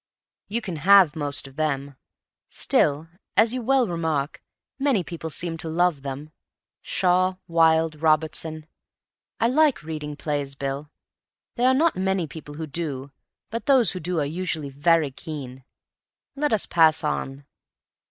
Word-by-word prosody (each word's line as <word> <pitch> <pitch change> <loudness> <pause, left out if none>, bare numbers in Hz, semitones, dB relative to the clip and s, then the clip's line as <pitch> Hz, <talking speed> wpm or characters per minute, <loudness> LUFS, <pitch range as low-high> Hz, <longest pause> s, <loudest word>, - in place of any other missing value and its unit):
You 230 +4 -2
can 185 -7 -5
have 185 0 +6
most 145 -2 -1
of 135 +1 -16
them. 140 -3 -2 0.5
Still, 145 +3 +1 0.3
as 225 +2 +5
you 255 - -2
well 260 0 +2
remark, 160 -5 -2 0.4
many 270 -9 +2
people 165 -1 -6
seem 165 +1 -2
to 160 0 -2
love 170 -2 +1
them. 140 +2 -6 0.5
Shaw, 185 0 +2
Wilde, 160 -2 +3
Robertson—I 155 +6 -2
like 275 - +3
reading 150 -2 -5
plays, 145 -2 -3
Bill. 140 +2 -4 0.6
There 245 +1 +2
are 260 - +4
not 325 +4 +3
many 190 -2 0
people 150 -1 -10
who 160 +1 -5
do, 145 -3 -4 0.4
but 230 +1 -5
those 255 -8 +5
who 185 - -5
do 175 0 -2
are 145 - 0
usually 160 -2 -3
very 155 +1 +2
keen. 130 -3 -8 0.7
Let 295 0 0
us 220 -3 +2
pass 160 -1 +4
on." 140 -2 -3
160 Hz, 145 wpm, -24 LUFS, 145-185 Hz, 0.7 s, have